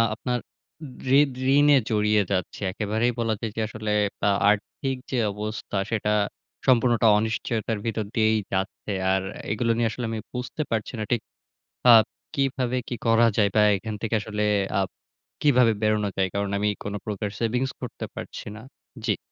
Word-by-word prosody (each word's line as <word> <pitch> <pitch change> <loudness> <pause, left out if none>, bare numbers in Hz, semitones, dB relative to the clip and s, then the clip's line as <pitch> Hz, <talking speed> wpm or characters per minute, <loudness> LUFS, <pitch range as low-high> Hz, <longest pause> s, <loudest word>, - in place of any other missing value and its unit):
আপনার 125 +1 -2 0.8
ঋদ 145 -2 +3 0.2
ঋণে 145 0 +6
জড়িয়ে 105 -1 +3
যাচ্ছি। 95 -3 -2
একেবারেই 110 +4 0
বলা 115 -1 +1
যায় 115 - -3
যে 115 - -1
আসলে 110 0 -4 0.4
আ - - +5 0.2
আর্থিক 105 +6 -1 0.2
যে 130 - 0 0.2
অবস্থা 105 0 -4
সেটা 105 -1 +1 0.5
সম্পূর্ণটা 120 -2 +4
অনিশ্চয়তার 110 0 -1
ভিতর 110 -2 -1
দিয়েই 110 -1 +3 0.2
যাচ্ছে। 95 +2 -2 0.2
আর 95 - +1 0.3
এগুলো 115 +2 +1
নিয়ে 115 -1 +2
আসলে 120 +2 -4
আমি 110 - -3
বুঝতে 125 +4 -4
পারছি 110 +1 -2
না - - -1
ঠিক 120 -3 +2 0.7
আপ 110 - +7 0.3
কিভাবে 130 -2 0
কি 125 - -2
করা 115 +1 +5
যায়? 105 -2 +4
বা 105 - +6 0.2
এখান 110 +2 -5
থেকে 115 0 -1
আসলে 105 0 -3 0.4
আপ 95 - -2 0.5
কিভাবে 125 -5 +5
বেরোনো 105 -1 +2
যায়? 95 -1 +2
কারণ 100 0 0
আমি 105 +1 +2
কোন 100 - -4
প্রকার 105 -1 -3
সেভিংস 125 +3 0
করতে - - -5
পারছি - - -7
না। 110 - -9 0.4
জি। 105 -4 +2
110 Hz, 160 wpm, -25 LUFS, 105-120 Hz, 0.8 s, আপ